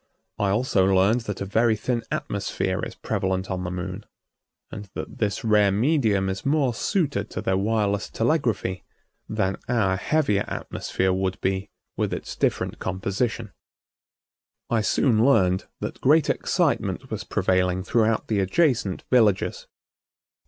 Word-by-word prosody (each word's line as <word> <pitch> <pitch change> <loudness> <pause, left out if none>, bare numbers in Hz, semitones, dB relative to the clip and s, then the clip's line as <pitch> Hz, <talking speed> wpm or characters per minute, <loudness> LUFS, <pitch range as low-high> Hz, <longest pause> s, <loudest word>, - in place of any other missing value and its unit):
I 100 - +1
also 100 -3 +2
learned 95 +5 +3
that 105 - -4
a - - -1
very 110 +3 +2
thin 120 +2 -1
atmosphere - - -2
is - - -5
prevalent 95 0 -2
on 90 -1 -2
the 90 - -3
Moon, 90 +3 -5 0.7
and 105 - -7
that - - -7
this 105 -3 -1
rare 105 -3 +4
medium 110 -4 +2
is 95 0 -3
more 140 -3 +2
suited 140 - -1
to - - -5
their 95 - 0
wireless 100 0 0
telegraphy 115 - 0 0.5
than 95 0 0
our 100 -6 +2
heavier 105 -3 +1
atmosphere 95 0 -2
would 95 0 -1
be 95 +1 -1 0.3
with - - 0
its - - -7
different - - -1
composition. 95 +3 -2 1.2
I 115 -2 +3
soon 110 +1 +2
learned 95 -8 +3
that - - -5
great 150 +2 +4
excitement - - -1
was - - -3
prevailing 95 0 +1
throughout 110 +1 +1
the 105 -2 0
adjacent 105 - +1
villages. 110 -6 +2
100 Hz, 140 wpm, -24 LUFS, 95-115 Hz, 1.2 s, rare